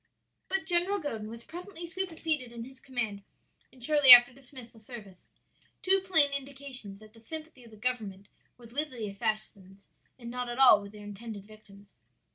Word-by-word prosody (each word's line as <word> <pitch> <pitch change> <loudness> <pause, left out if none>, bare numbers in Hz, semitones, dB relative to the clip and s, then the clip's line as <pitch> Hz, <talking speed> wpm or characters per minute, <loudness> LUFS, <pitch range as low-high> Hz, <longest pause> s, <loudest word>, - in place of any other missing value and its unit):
"But 385 -3 -1
General 355 +4 +1
Godin 225 - -5
was 230 +1 -10
presently 350 +2 -9
superseded 325 -7 -3
in 235 -1 -7
his 265 +2 -13
command 230 -6 -4 0.5
and 255 -2 -16
shortly 290 -3 +7
after 245 0 +11
dismissed 255 -2 -12
the 225 - -17
service. 215 -5 -12 0.6
Two 385 +1 +3
plain 320 -7 +3
indications 270 -7 -5
that 215 0 -16
the 225 - -17
sympathy 310 +2 -8
of 235 - -15
the 215 - -15
government 210 -5 -4 0.3
was 235 -1 -15
with 300 +3 -1
the 230 -5 -6
assassins 200 -2 -5 0.3
and 235 -2 -9
not 250 0 -4
at 240 - -5
all 250 -6 +7
with 200 0 -10
their 210 -1 -12
intended 205 0 -8
victims." 205 -2 -17
245 Hz, 175 wpm, -29 LUFS, 215-285 Hz, 0.6 s, after